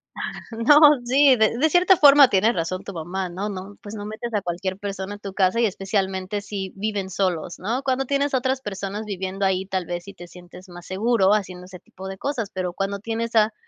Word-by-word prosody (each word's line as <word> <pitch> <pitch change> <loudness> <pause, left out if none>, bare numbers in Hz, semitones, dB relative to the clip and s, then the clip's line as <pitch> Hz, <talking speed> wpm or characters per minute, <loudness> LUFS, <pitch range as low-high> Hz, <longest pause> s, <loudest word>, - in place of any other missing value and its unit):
Ah. - - -6 0.3
No, 230 +6 +4 0.3
sí, 270 +1 +5
de 220 +2 +2
de 315 +4 +3
cierta 365 +2 +5
forma 285 -2 +8
tiene 210 +5 +3
razón 185 +2 -3
tu 200 - -8
mamá, 180 +3 -4
¿no? 195 +4 -4
No, 195 +1 -8
pues 210 +1 -9
no 205 0 -6
metes 220 +3 -6
a 210 - +1
cualquier 185 +2 -3
persona 200 -1 -5
a - - -11
tu 200 -2 -8
casa 190 +4 +2
y 235 - +4
especialmente 195 0 -2
si 195 -2 -5
viven 200 -1 -3
solos, 180 -3 -2
¿no? 230 +8 -2
Cuando 270 0 -1
tienes 280 +1 0
a - - +4
otras 260 +1 -1
personas 200 0 -5
viviendo 195 -1 -4
ahí, 190 0 0
tal 185 -2 -3
vez 175 0 -4
sí 200 - -11
te 175 - -12
sientes 180 +2 -14
más 175 0 -11
seguro 200 0 +2
haciendo 180 -3 -3
ese 180 -1 -12
tipo 190 +3 -11
de 190 0 -7
cosas, 240 -8 -3
pero 180 -2 -3
cuando 195 +1 -3
tienes 230 +2 -4
a 215 0 +4
200 Hz, 225 wpm, -23 LUFS, 185-225 Hz, 0.3 s, forma